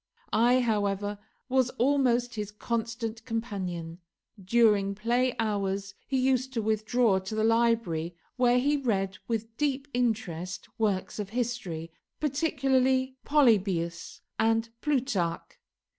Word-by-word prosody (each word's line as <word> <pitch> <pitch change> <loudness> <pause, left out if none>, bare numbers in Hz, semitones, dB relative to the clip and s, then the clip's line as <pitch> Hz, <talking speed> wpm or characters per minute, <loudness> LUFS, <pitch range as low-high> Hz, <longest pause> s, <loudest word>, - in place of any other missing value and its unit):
I, 245 +3 +4
however, 205 -3 0 0.3
was 260 -1 +2
almost 245 -2 +2
his 210 -3 -4
constant 230 +1 -3
companion. 185 -8 -4 0.4
During 205 -1 +3
play 240 +4 +1
hours 200 -2 -1
he 270 - 0
used 260 0 +1
to 230 - 0
withdraw 220 -1 +2
to 190 +3 -6
the 215 - +1
library, 225 -8 +1 0.2
where 245 -1 +4
he 290 +4 +2
read 195 -8 -1
with 225 -1 -3
deep 285 -1 0
interest 205 -7 -2
works 205 -2 0
of 205 -2 -3
history, 220 -9 -3 0.3
particularly 265 -3 +1
Polybius 195 - +2 0.2
and 225 +1 +2
Plutarch. 245 - -1
225 Hz, 115 wpm, -28 LUFS, 200-250 Hz, 0.4 s, I